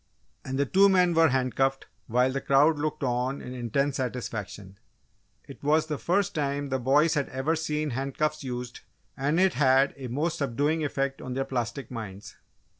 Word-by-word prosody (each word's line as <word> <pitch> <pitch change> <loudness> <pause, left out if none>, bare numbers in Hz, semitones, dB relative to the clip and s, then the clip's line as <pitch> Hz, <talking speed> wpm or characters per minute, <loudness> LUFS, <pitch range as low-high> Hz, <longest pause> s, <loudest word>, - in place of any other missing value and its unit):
And 130 0 -4
the 140 - +2
two 195 +7 +5
men 180 -2 +4
were 165 0 +5
handcuffed 135 +1 0 0.2
while 125 +2 +2
the 135 +1 -3
crowd 145 +3 +4
looked 150 -1 -2
on 125 +2 -1
in 125 - -8
intense 135 +3 -1
satisfaction. 110 -6 -5 0.7
It - - -12
was 155 +2 +2
the 150 -2 -4
first 195 +3 +1
time 140 -1 -2
the 130 0 -1
boys 145 +6 +3
had 145 -2 -1
ever 135 +5 -1
seen 155 -2 -2
handcuffs 140 +4 -2
used 125 -1 -5 0.4
and 145 +5 0
it 190 -1 +4
had 135 0 +3
a 135 -2 -6
most 150 +7 -2
subduing 145 +4 0
effect 140 -2 -2
on 125 -1 -5
their 135 0 -1
plastic 125 -1 -4
minds. 105 -4 -8
135 Hz, 175 wpm, -27 LUFS, 125-150 Hz, 0.7 s, two